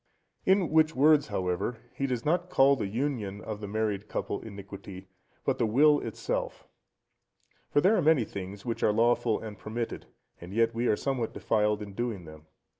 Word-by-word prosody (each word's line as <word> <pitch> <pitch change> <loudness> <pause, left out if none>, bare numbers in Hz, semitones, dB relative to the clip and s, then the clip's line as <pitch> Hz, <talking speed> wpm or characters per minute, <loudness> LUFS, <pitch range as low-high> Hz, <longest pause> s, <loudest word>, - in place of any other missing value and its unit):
In 190 -4 +3
which 160 0 +4
words, 145 +2 +5
however, 90 +6 -2 0.2
he 135 - -2
does 125 -1 -3
not 175 +3 +1
call 140 -2 +5
the 115 - -3
union 110 -3 -2
of 105 -1 -6
the 105 - -5
married 105 -1 -2
couple - - -3
iniquity, 100 -2 -10 0.4
but 135 -1 0
the 115 - +2
will 145 +6 +5
itself. 115 - -4 1.0
For 145 - +3
there 195 +7 +4
are - - +2
many 155 -6 +4
things 100 0 -7
which 115 -2 -3
are - - +4
lawful 115 0 +2
and 105 -3 -8
permitted, 115 +3 -5 0.3
and 90 +4 -9
yet 115 0 +3
we 120 +2 0
are 105 - +3
somewhat 130 -5 -2
defiled 105 -1 +1
in 100 -1 -9
doing 110 -5 -3
them. 80 0 -13
115 Hz, 180 wpm, -29 LUFS, 100-135 Hz, 1.0 s, words